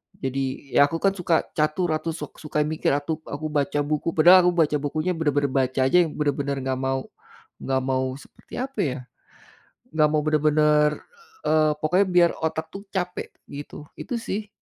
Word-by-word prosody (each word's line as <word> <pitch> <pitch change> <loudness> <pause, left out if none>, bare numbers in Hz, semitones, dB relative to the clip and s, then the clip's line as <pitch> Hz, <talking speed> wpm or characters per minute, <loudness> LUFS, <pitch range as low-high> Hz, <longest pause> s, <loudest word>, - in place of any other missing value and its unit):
jadi 135 +1 -4
aku 145 +3 +4
kan 195 - +4
suka 175 -3 0 0.2
catur, 155 +3 +1
atau 155 +1 -1
suk - - -9
suka 150 -1 -1
mikir, 155 +1 -1
atau 150 +2 -3
aku 145 +2 -5
baca 145 0 0
buku. 150 +2 -2
Padahal 180 +3 +7
aku - - +4
baca 155 -3 +2
bukunya 155 +5 -2
benar-benar 145 -3 0
baca 130 0 0
aja, 180 - +4
yang 160 - -4
benar-benar 140 -1 -1
nggak 130 0 -2
mau 135 0 0 0.6
nggak 130 -1 0
mau 130 0 -1
seperti - - -19
apa 265 -3 -5
ya, 135 -2 -2 1.0
nggak 155 -1 +4
mau 155 - +2
benar-benar 150 0 +3 0.6
eee, 155 -1 +4
pokoknya 180 +6 +2
biar 175 -1 +6
otak 160 0 -2
tuh 195 - -8
capek, 180 -1 -3 0.2
gitu. 145 +1 -9
Itu 250 - -4
sih. 210 -1 -4
150 Hz, 170 wpm, -24 LUFS, 140-165 Hz, 1.0 s, Padahal